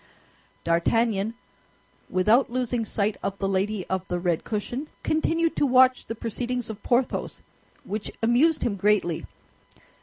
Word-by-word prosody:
D'Artagnan, 210 +5 +1 0.7
without 215 +8 +3
losing 245 -1 -1
sight 205 0 0
of 195 - -3
the 195 - -1
lady 195 +1 -1
of 190 -1 -1
the 180 - -1
red 175 -2 0
cushion, 240 +7 -4 0.2
continued 325 +1 +1
to 290 - +3
watch 255 0 +4
the 225 - -4
proceedings 240 +1 -3
of 215 - -10
Porthos, 245 0 -1 0.4
which 205 +1 -4
amused 260 +8 +3
him 205 -4 -1
greatly. 195 -4 +1
220 Hz, 130 wpm, -25 LUFS, 195-250 Hz, 0.7 s, watch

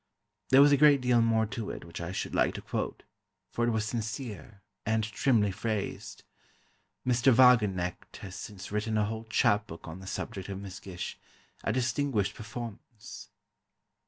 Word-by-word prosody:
There 135 +2 +8
was 145 - +6
a 140 - +6
great 145 0 +6
deal 125 -2 +3
more 115 -1 +3
to 110 0 -5
it - - -7
which 85 0 -8
I 85 +1 -4
should 95 - -4
like - - +2
to - - -5
quote, - - -3 0.5
for 120 - 0
it - - +3
was 110 -2 0
sincere, 110 - -5 0.2
and 110 0 +1
trimly 110 -1 +2
phrased. 105 +1 -4 0.8
Mr. 125 +1 +4
Wagenknecht 105 -8 +3
has 95 -2 -8
since 100 0 -8
written 105 +1 -1
a 105 - +2
whole 110 +1 -4
chapbook 105 -6 +1
on 80 +3 -7
the 95 - -10
subject 95 0 -5
of 95 -1 -4
Miss 95 -2 -8
Gish, 90 -2 -6 0.4
a - - 0
distinguished 120 -4 0
performance. 115 -1 -9
110 Hz, 160 wpm, -30 LUFS, 100-120 Hz, 0.8 s, There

